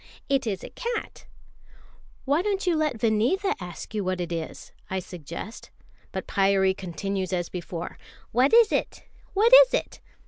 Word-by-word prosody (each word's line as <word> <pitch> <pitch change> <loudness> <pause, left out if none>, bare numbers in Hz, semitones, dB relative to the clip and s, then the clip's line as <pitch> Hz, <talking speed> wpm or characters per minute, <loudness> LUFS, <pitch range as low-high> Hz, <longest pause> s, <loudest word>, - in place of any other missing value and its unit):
It 275 -3 +1
is 195 -4 -2
a - - -8
cat." 475 -2 -5 1.0
"Why 285 +4 +2
don't 395 -1 -1
you 350 -2 +2
let 305 -6 0
Vineetha 240 - +2
ask 180 +2 -8
you 210 -2 -1
what 185 0 -1
it 175 -1 -3
is?" 165 -2 -5 0.2
I 190 - -2
suggest; 180 - -7 0.4
but - - -4
Pyârie 195 -1 +2
continues 190 +1 -3
as 175 -2 -1
before: 175 -1 -6 0.3
"What 255 +4 +3
is 460 -2 +6
it? - - -1 0.3
What 450 +5 +4
is - - -1
it?" - - -3
210 Hz, 160 wpm, -26 LUFS, -, 1.0 s, is